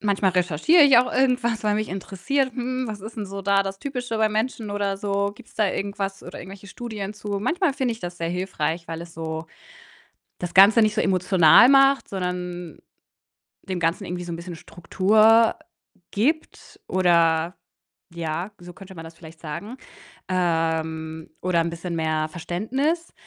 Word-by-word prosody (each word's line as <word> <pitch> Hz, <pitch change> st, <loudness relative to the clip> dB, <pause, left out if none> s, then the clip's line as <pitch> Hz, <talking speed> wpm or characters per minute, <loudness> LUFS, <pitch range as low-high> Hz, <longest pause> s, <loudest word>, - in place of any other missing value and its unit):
manchmal 200 Hz, -2 st, +1 dB
recherchiere 180 Hz, -, +3 dB
ich 275 Hz, -4 st, +7 dB
auch 245 Hz, -, +4 dB
irgendwas, 250 Hz, -4 st, +1 dB
weil 210 Hz, -1 st, +1 dB
mich 215 Hz, -2 st, -2 dB
interessiert, 195 Hz, +8 st, -2 dB
hm, 255 Hz, +1 st, -3 dB
was 210 Hz, -2 st, -6 dB
ist 220 Hz, +2 st, -9 dB
'n 205 Hz, -, -4 dB
so 195 Hz, 0 st, -7 dB
da 200 Hz, 0 st, +3 dB
das 195 Hz, 0 st, -6 dB
Typische 250 Hz, -4 st, -4 dB
beim 220 Hz, -1 st, +1 dB
Menschen 220 Hz, -1 st, -2 dB
oder 200 Hz, -1 st, -1 dB
so? 200 Hz, 0 st, -1 dB
Gibt's 235 Hz, +2 st, -17 dB
da 215 Hz, -2 st, +2 dB
irgendwas 195 Hz, 0 st, -4 dB
oder -, -, -9 dB
irgendwelche 195 Hz, +2 st, -11 dB
Studien 210 Hz, -2 st, -6 dB
zu? 205 Hz, -1 st, -4 dB
Manchmal 330 Hz, -, 0 dB
finde 260 Hz, -4 st, -1 dB
ich 225 Hz, -, -10 dB
das 175 Hz, 0 st, -6 dB
sehr 165 Hz, -1 st, -3 dB
hilfreich, 170 Hz, -2 st, -3 dB
weil 165 Hz, 0 st, -5 dB
es 170 Hz, -1 st, -12 dB
so 160 Hz, 0 st, -5 dB, 0.9 s
das 175 Hz, -1 st, -5 dB
Ganze 200 Hz, +5 st, +7 dB
nicht 215 Hz, -1 st, +2 dB
so -, -, 0 dB
emotional 185 Hz, -, +5 dB
macht, 275 Hz, 0 st, +5 dB
sondern 180 Hz, -2 st, -5 dB, 0.9 s
dem 185 Hz, -2 st, -4 dB
Ganzen 170 Hz, +4 st, 0 dB
irgendwie 180 Hz, 0 st, -5 dB
so 175 Hz, -, -7 dB
'n 165 Hz, -, -4 dB
bisschen 170 Hz, 0 st, -8 dB
Struktur 215 Hz, +7 st, +3 dB, 0.6 s
gibt, 300 Hz, +10 st, -2 dB
oder 170 Hz, -2 st, +2 dB, 0.6 s
ja, 170 Hz, +3 st, -4 dB
so 175 Hz, 0 st, -11 dB
könnte 190 Hz, 0 st, -13 dB
man 165 Hz, 0 st, -9 dB
das 165 Hz, -, -11 dB
vielleicht 160 Hz, -1 st, -14 dB
sagen, 200 Hz, -, -7 dB, 0.5 s
ähm, 160 Hz, -2 st, -1 dB
oder 175 Hz, -2 st, +1 dB
'n 165 Hz, -, -1 dB
bisschen 170 Hz, +1 st, -5 dB
mehr 155 Hz, -1 st, 0 dB
Verständnis. 260 Hz, -, -2 dB
195 Hz, 170 wpm, -23 LUFS, 170-220 Hz, 0.9 s, ich